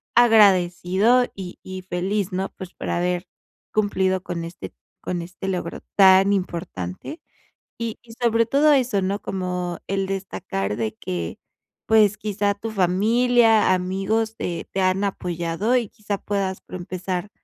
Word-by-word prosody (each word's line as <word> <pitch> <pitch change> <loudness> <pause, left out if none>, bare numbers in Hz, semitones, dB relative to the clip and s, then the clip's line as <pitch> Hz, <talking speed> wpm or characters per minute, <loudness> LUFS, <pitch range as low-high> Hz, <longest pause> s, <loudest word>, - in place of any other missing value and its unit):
agradecido 205 0 +5
y 185 -2 -7
y 185 0 -7
feliz, 190 +2 -2
¿no?, 190 +1 -1
pues, 185 -1 -8
para - - -3
haber 180 +1 -1 0.5
cumplido 190 -3 +1
con 175 -2 -4
este 165 - -8 0.3
con 175 -1 -3
este 180 +2 -8
logro 180 -2 -3 0.2
tan 195 0 +6
importante, 170 - -4 0.6
y 230 -1 -3
y 235 - -15
sobre 230 -1 +3
todo 290 +6 +4
eso, 250 -7 +2
¿no?, 195 +2 -1
como 180 -2 -3
el 195 0 0
destacar 185 - -3
de 110 -2 -2
que, 85 -2 -5 0.5
pues, 215 -2 +5
quizá 205 -1 0
tu 215 +3 -5
familia, 220 +3 +4
amigos, 195 +5 -1
te 170 -1 -4
te 190 - 0
han 185 +1 +2
apoyado, 180 +4 -1
y 235 -4 -1
quizá, 205 -1 -4
puedas 195 -2 -2
pro - - -10
empezar, 185 +1 -4
190 Hz, 140 wpm, -23 LUFS, 180-215 Hz, 0.6 s, tan